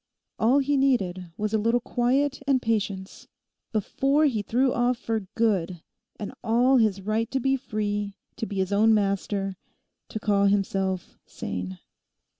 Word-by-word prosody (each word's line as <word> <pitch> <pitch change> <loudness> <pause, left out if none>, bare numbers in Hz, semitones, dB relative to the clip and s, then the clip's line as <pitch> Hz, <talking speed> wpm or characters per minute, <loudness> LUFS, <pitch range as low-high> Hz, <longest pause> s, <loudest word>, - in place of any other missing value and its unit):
All 240 +5 +4
he 285 0 +2
needed 190 -10 +1
was 215 +1 -2
a 220 - +3
little 230 +3 +2
quiet 260 +4 0
and 270 -2 +4
patience 205 -5 -2 0.4
before 270 +7 +1
he 235 -8 +1
threw 250 +5 +1
off 245 0 +1
for 225 -5 -3
good 190 -7 0 0.4
and 210 - -5
all 245 +4 +4
his 215 -4 +2
right 220 +3 -1
to 265 - -1
be 270 +2 +2
free, 205 -5 -3 0.2
to 225 -2 -3
be 205 - -6
his 190 +1 0
own 220 +2 +5
master, 195 -1 -1 0.5
to 220 - -4
call 200 -2 +2
himself 195 -2 -1
sane. 90 0 -5
215 Hz, 150 wpm, -26 LUFS, 195-245 Hz, 0.5 s, own